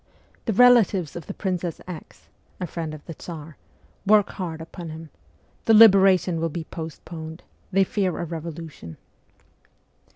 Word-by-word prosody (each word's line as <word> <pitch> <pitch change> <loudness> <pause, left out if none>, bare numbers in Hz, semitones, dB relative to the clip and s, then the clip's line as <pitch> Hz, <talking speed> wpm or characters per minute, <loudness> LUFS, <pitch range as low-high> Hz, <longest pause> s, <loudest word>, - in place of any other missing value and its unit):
' - - -34
The 220 - +1
relatives 210 - +5
of 170 - -7
the 200 - -5
Princess 180 -4 -3
X. 175 -4 -10 0.3
[a 180 - -2
friend 160 -2 -5
of 150 - -14
the 165 - -7
Tsar] 160 -1 -9 0.5
work 210 0 +4
hard 170 -4 -5
upon 165 +1 -8
him.' 160 -1 -9 0.3
' 70 - -37
The 225 - +6
liberation 190 -5 +6
will 165 - 0
be 165 +1 -5
postponed: 160 0 -8 0.3
they 195 +1 +4
fear 190 -2 -1
a 175 - -3
revolution.' 160 - -7
170 Hz, 155 wpm, -24 LUFS, 160-190 Hz, 0.5 s, The